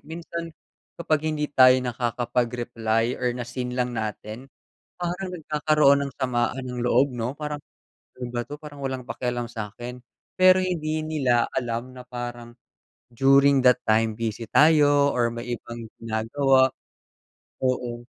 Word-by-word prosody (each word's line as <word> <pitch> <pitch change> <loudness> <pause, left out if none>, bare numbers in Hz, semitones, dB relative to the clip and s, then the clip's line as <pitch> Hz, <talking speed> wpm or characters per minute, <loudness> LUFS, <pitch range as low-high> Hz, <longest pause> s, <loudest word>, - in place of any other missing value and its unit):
minsan 170 0 -6 0.5
kapag 155 -2 0
hindi 150 -1 -1
tayo 130 -1 +7
nakakapag-reply 120 -1 -1
or 125 - +1
na 120 - -4
seen 125 +1 -5
lang 125 -1 0
natin, 110 +3 -5 0.5
parang 180 +2 -3
nagkakaroon 150 -3 +3
ng 140 - -6
samaan 125 0 -1
ng 125 -1 -5
loob 125 +3 +3
'no. 120 +2 -2
Parang, 150 0 -5 0.6
ano 125 - -3
ba 120 - -1
'to, 145 +4 -9
parang 145 -2 -10
walang 130 -2 -4
pakialam 120 0 -3
sa'kin. 120 +2 -7 0.3
Pero 185 0 +6
hindi 160 -4 -1
nila 130 -6 +2
alam 120 +1 -3
na 125 - -9
parang, 120 -1 -7 0.6
during 135 +1 +5
that 125 -1 +5
time 110 +1 +3
busy 115 0 -3
tayo 145 -2 +5
or 120 -1 +1
may 120 +1 -4
ibang 115 0 -9 0.2
ginagawa, 130 +4 +3 1.0
oo. 120 -2 -2
125 Hz, 135 wpm, -25 LUFS, 120-145 Hz, 1.0 s, tayo